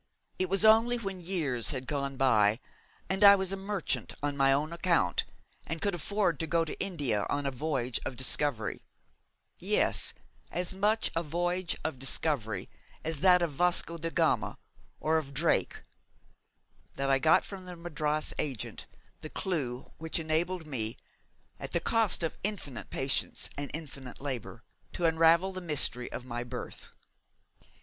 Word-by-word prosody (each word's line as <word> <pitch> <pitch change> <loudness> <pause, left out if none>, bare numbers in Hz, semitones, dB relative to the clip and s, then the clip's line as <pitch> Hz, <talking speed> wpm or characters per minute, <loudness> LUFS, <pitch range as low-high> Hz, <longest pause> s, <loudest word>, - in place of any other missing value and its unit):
It 185 -1 +1
was 195 +3 +2
only 225 +3 +6
when 195 -5 -5
years 155 - 0
had 130 -2 -2
gone 140 -1 -2
by 110 -4 +4 0.5
and 190 +2 0
I 200 0 +10
was 190 -1 0
a - - 0
merchant 195 -2 -2
on 145 -1 -1
my 135 -1 +4
own 150 +4 +1
account 170 - +1 0.4
and 165 +1 -3
could 200 +3 0
afford 175 -1 0
to 160 - -1
go 165 +1 +2
to 155 - -6
India 140 - 0
on 145 0 -1
a 140 - 0
voyage 130 -3 -2
of 130 - -4
discovery 130 -3 0 0.8
yes, - - +2 0.4
as 180 +1 -2
much 210 +3 +1
a 165 - +1
voyage 175 +3 -1
of 160 -5 -3
discovery 130 - 0 0.4
as 160 -2 -2
that 180 +1 +5
of 170 - -1
Vasco 170 +1 +2
de 165 +1 -2
Gama - - +1 0.4
or 160 +1 +2
of 140 -3 -9
Drake 165 +4 +1 1.1
that 135 0 0
I 135 - +4
got 160 +3 +4
from 190 -2 -8
the 180 -1 -7
Madras 155 -3 0
agent 130 -9 -4 0.3
the 155 - -7
clue 135 -11 -2
which 160 0 -1
enabled 165 +2 -1
me, 115 -7 -3 0.6
at - - -7
the - - +3
cost 225 -6 +2
of 165 - -2
infinite 185 - -2
patience 135 0 -1
and 145 -1 -4
infinite 140 -5 -7
labour, 135 -6 -5 0.3
to 175 - -1
unravel 165 +3 +4
the 185 0 -6
mystery 145 -7 +1
of 125 - -6
my 120 -1 -4
birth. 120 0 -7
160 Hz, 155 wpm, -30 LUFS, 135-180 Hz, 1.1 s, I